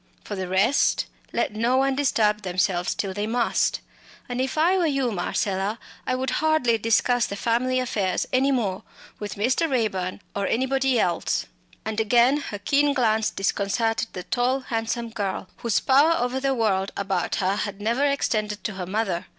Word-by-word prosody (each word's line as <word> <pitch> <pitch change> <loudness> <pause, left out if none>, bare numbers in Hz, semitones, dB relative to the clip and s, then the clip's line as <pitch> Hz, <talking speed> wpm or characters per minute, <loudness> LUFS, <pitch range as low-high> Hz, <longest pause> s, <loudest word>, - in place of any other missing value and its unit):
For - - -5
the 190 -1 -4
rest 195 +9 +2 0.3
let - - -1
no 235 +4 +1
one 270 0 +2
disturb 215 -6 +2
themselves 180 -1 0
till 195 -2 -3
they 205 +2 -2
must. 235 +1 +1 0.5
And 245 0 -2
if 265 +3 -2
I 340 +5 +4
were 355 -3 +2
you, 275 -5 0
Marcella, 195 +2 -1 0.3
I 255 - +1
would 260 0 -2
hardly 310 -8 +2
discuss 230 +2 +2
the 200 - -5
family 245 +4 +1
affairs 210 -7 -1
any 265 +2 +3
more 210 -8 -1 0.4
with 210 -1 -5
Mr. 255 +10 +1
Raeburn 200 -7 -1
or 200 -1 -1
anybody 265 0 +1
else." 175 -4 0 0.4
And 220 0 -2
again 240 +5 +4
her 250 -8 -5
keen 280 +7 +2
glance 220 -4 +2
disconcerted 210 +4 0
the 180 - -6
tall 250 +6 0
handsome 230 -1 -3
girl, 200 -4 -3
whose 235 -3 +1
power 285 +5 +4
over 250 +2 -1
the 270 0 0
world 200 -4 +1
about 195 -3 -1
her 195 +1 0
had 205 -1 -3
never 230 +6 0
extended 215 -7 0
to 210 - -3
her 185 -2 -5
mother. 190 -3 -2
225 Hz, 170 wpm, -24 LUFS, 200-260 Hz, 0.5 s, I